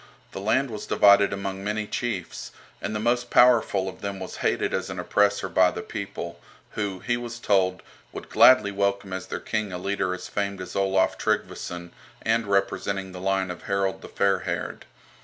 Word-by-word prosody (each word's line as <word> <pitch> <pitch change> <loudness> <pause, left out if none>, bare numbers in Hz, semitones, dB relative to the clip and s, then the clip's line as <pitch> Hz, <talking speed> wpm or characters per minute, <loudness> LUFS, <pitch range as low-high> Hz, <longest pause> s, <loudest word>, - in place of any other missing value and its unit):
The 95 - -6
land 120 +5 +1
was 105 -1 -6
divided 100 0 +5
among 100 0 -4
many 105 +1 -2
chiefs, 105 -5 -4 0.3
and 110 - -3
the - - -1
most 120 +2 0
powerful 115 -6 +4
of 95 - -8
them 100 -1 -4
was 95 - -7
hated - - 0
as - - -2
an - - -6
oppressor 100 -1 +1
by 95 -1 +4
the 90 - -6
people, 85 -4 -6 0.3
who, 100 -3 -3
he 120 -1 0
was 120 0 -6
told, 95 -5 +1 0.3
would - - -8
gladly 130 -6 +6
welcome 100 -1 -1
as 95 0 -5
their - - -4
king 110 -3 -2
a 90 - -4
leader 95 0 -1
as - - -8
famed 100 -1 -2
as 90 -1 -7
Olaf 95 -1 +2
Tryggveson, 85 0 -2 0.3
and 115 -1 +1
representing 100 -1 0
the 90 0 -8
line 95 -1 0
of 90 - -8
Harold 100 -1 0
the - - -10
Fair 100 -1 +2
haired. - - -4
100 Hz, 185 wpm, -25 LUFS, 95-105 Hz, 0.3 s, gladly